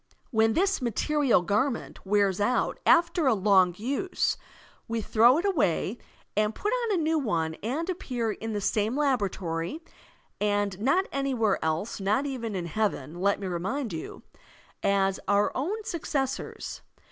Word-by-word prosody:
When 220 Hz, -1 st, +3 dB
this 390 Hz, -, +1 dB
material 255 Hz, -, +2 dB
garment 220 Hz, +7 st, -1 dB
wears 200 Hz, -1 st, +2 dB
out 245 Hz, +5 st, +1 dB
after 335 Hz, -2 st, +4 dB
a 250 Hz, -, +4 dB
long 190 Hz, -3 st, +4 dB
use, 280 Hz, -, -1 dB, 0.5 s
we 230 Hz, 0 st, -1 dB
throw 230 Hz, +5 st, +5 dB
it 345 Hz, -, -1 dB
away 235 Hz, -, +1 dB, 0.4 s
and 215 Hz, +1 st, +1 dB
put 420 Hz, -, -1 dB
on 475 Hz, -4 st, 0 dB
a 335 Hz, -, 0 dB
new 320 Hz, 0 st, +2 dB
one 165 Hz, -, -1 dB
and 275 Hz, -, -2 dB
appear 250 Hz, -, -2 dB
in 225 Hz, +1 st, -5 dB
the 205 Hz, -, -2 dB
same 215 Hz, +5 st, 0 dB
laboratory 200 Hz, -, -1 dB, 0.6 s
(and 205 Hz, -2 st, 0 dB
not 280 Hz, -, +2 dB
anywhere 255 Hz, -7 st, 0 dB
else, 160 Hz, +9 st, -1 dB
not 210 Hz, +8 st, +1 dB
even 235 Hz, -6 st, -4 dB
in 180 Hz, -2 st, -2 dB
Heaven, 175 Hz, -4 st, -2 dB
let 200 Hz, +1 st, +2 dB
me 200 Hz, -, -5 dB
remind 190 Hz, +7 st, -2 dB
you) 160 Hz, -, -7 dB, 0.6 s
as 195 Hz, -1 st, +2 dB
our 205 Hz, 0 st, +3 dB
own 395 Hz, +12 st, -2 dB
successors. 275 Hz, -7 st, -3 dB
220 Hz, 145 wpm, -27 LUFS, 195-280 Hz, 0.6 s, throw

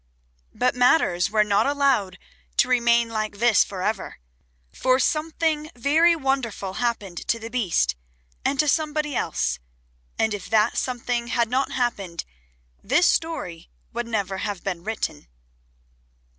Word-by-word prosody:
But 250 Hz, 0 st, +2 dB
matters 245 Hz, -, +3 dB
were 215 Hz, 0 st, +3 dB
not 205 Hz, +2 st, +2 dB
allowed 270 Hz, -10 st, +1 dB, 0.4 s
to -, -, +4 dB
remain 235 Hz, -2 st, +3 dB
like 215 Hz, -2 st, -3 dB
this 235 Hz, -1 st, +5 dB
for 185 Hz, -2 st, -6 dB
ever, 215 Hz, -1 st, -2 dB, 0.6 s
for 255 Hz, 0 st, +2 dB
something 310 Hz, +2 st, 0 dB
very 315 Hz, +7 st, +4 dB
wonderful 260 Hz, -, -2 dB
happened 205 Hz, -7 st, -2 dB
to 230 Hz, -, +1 dB
the 230 Hz, 0 st, -8 dB
Beast 175 Hz, -, +1 dB, 0.5 s
and 275 Hz, -, 0 dB
to 300 Hz, -, +3 dB
somebody 300 Hz, -1 st, 0 dB
else, -, -, -1 dB, 0.6 s
and 220 Hz, -1 st, +1 dB
if 205 Hz, -3 st, -6 dB
that 220 Hz, +1 st, +3 dB
something 245 Hz, -1 st, -2 dB
had 235 Hz, -1 st, +1 dB
not 265 Hz, +2 st, 0 dB
happened 200 Hz, -9 st, -2 dB, 0.6 s
this 355 Hz, -, +3 dB
story 180 Hz, -, -1 dB, 0.2 s
would 235 Hz, 0 st, -3 dB
never 200 Hz, -4 st, -2 dB
have 205 Hz, -3 st, -4 dB
been 180 Hz, -3 st, -3 dB
written. 220 Hz, -, -4 dB
235 Hz, 135 wpm, -24 LUFS, 205-270 Hz, 0.6 s, this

